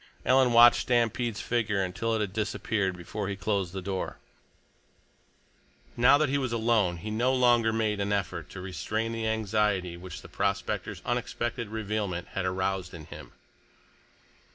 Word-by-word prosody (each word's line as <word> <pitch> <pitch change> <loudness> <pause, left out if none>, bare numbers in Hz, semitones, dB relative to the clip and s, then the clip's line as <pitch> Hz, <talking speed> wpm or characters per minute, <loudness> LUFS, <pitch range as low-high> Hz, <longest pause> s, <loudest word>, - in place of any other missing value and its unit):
Alan 130 -1 +4
watched 120 +1 +7
Stampede's 120 -2 0
figure 105 -5 0
until 95 +5 -1
it 110 - 0
had 100 -3 -2
disappeared 100 -3 -1
before 100 +4 -5
he 100 - -2
closed 100 -3 -1
the 95 0 -6
door. 95 0 -3 1.8
Now 125 +4 +6
that 155 +1 +2
he 140 +2 +1
was 130 -3 -2
alone, 110 -6 +2
he 105 +6 -6
no 120 +4 +2
longer 120 -3 +4
made 110 -2 0
an 100 0 -1
effort 90 -5 -2
to 95 - -8
restrain 95 +6 -3
the 115 -1 -2
anxiety 105 -5 0
which 90 +1 -9
the - - -10
prospector's - - -2
unexpected 120 -1 -2
revealment 105 -4 -3
had 95 - -3
aroused 95 -1 -2
in 80 -2 -9
him. - - -11
105 Hz, 155 wpm, -28 LUFS, 95-115 Hz, 1.8 s, watched